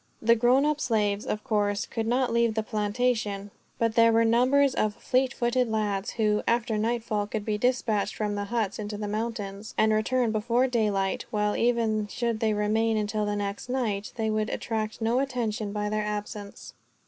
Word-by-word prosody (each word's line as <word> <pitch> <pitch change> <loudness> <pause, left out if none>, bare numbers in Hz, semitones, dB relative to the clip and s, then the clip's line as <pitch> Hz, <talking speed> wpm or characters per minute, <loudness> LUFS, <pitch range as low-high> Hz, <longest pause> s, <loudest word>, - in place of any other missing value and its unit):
The 230 +1 +4
grown 250 +4 +4
up 300 0 0
slaves, 210 -3 0
of 210 - -2
course, 205 -1 0
could 225 -1 -3
not 245 0 +1
leave 235 -1 +2
the 220 - 0
plantation; 210 -1 -1 0.3
but 230 -1 +1
there 230 0 +5
were 230 0 +4
numbers 255 +4 +4
of 215 -4 0
fleet 255 +1 +1
footed 245 -1 0
lads 210 -1 -1
who, 210 -2 +1
after 235 -1 +1
nightfall, 220 -1 -1
could 210 -1 -4
be 210 -1 -1
dispatched 235 -4 0
from 210 -1 -2
the 205 0 -2
huts 215 -2 -2
into 205 0 -4
the 210 0 -4
mountains, 210 -1 -4
and 220 0 +4
return 230 +2 +1
before 235 +4 +1
daylight; 210 -6 0
while, 210 -1 0
even 225 -3 +1
should 235 0 -2
they 220 -2 +1
remain 220 +2 +1
until 210 0 -1
the 205 - -1
next 200 +3 -4
night, 220 -6 -1
they 220 -2 -1
would 215 0 0
attract 220 0 -3
no 230 +3 +2
attention 235 -6 -2
by 210 0 -2
their 215 0 -1
absence. 210 -1 -6
220 Hz, 185 wpm, -27 LUFS, 210-235 Hz, 0.3 s, there